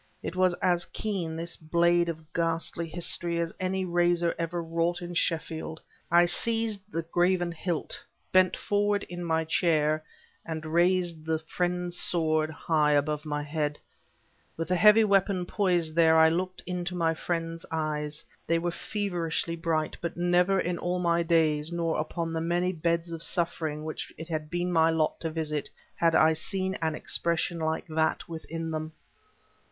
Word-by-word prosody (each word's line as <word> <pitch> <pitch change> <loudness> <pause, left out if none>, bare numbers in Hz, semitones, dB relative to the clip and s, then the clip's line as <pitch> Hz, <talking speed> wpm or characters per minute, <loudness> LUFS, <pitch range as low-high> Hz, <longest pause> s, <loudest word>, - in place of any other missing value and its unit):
It - - -4
was 185 -1 +3
as 175 -1 +2
keen, 185 -7 -3
this 165 +1 -3
blade 170 +2 +2
of 160 -1 -7
ghastly 165 0 -1
history, 170 +1 -1
as 165 -1 -2
any 185 0 -1
razor 175 -1 +2
ever 170 +1 -2
wrought 165 +1 0
in 175 -1 -6
Sheffield. 160 -1 -1 0.3
I 175 +1 +6
seized 215 +1 +1
the 165 -3 -2
graven 175 +1 +1
hilt, 170 -1 -3 0.3
bent 185 -1 +4
forward 205 0 +1
in 175 0 -5
my 160 -1 0
chair, 155 -2 +2 0.4
and 160 -1 -5
raised 175 0 +1
the 160 0 0
Friend's 175 +2 -2
Sword 155 -2 +1
high 155 -1 +1
above 150 +1 0
my 150 -1 -2
head. 150 0 -2 0.8
With 165 +1 -3
the 180 - +3
heavy 210 +5 +7
weapon 195 -3 +2
poised 175 -5 +1
there, 160 -1 +5
I 160 0 +7
looked 185 +2 -2
into 180 0 -3
my 165 -2 +2
friend's 165 0 -3
eyes. 150 -1 -2 0.2
They 165 - +3
were 170 +1 -1
feverishly 170 -4 -2
bright, 165 -2 -1
but 170 0 -4
never 180 +2 +3
in 180 -1 -1
all 180 +1 -1
my 170 -1 +2
days, 160 -2 +2
nor 170 -2 -1
upon 165 +1 -3
the 160 - -1
many 175 +2 0
beds 170 0 -1
of 165 -1 -5
suffering 160 -3 0
which 155 - -5
it 160 +1 -7
had 155 -2 -3
been 175 +1 -1
my 165 -1 +4
lot 160 -1 0
to 165 - -3
visit, 155 -2 -3 0.2
had 165 -1 +2
I 160 +1 +6
seen 190 +4 -1
an 160 -1 0
expression 170 +1 -1
like 160 0 -1
that 160 0 0
within 165 0 -5
them. 155 0 -4
170 Hz, 165 wpm, -28 LUFS, 160-175 Hz, 0.8 s, heavy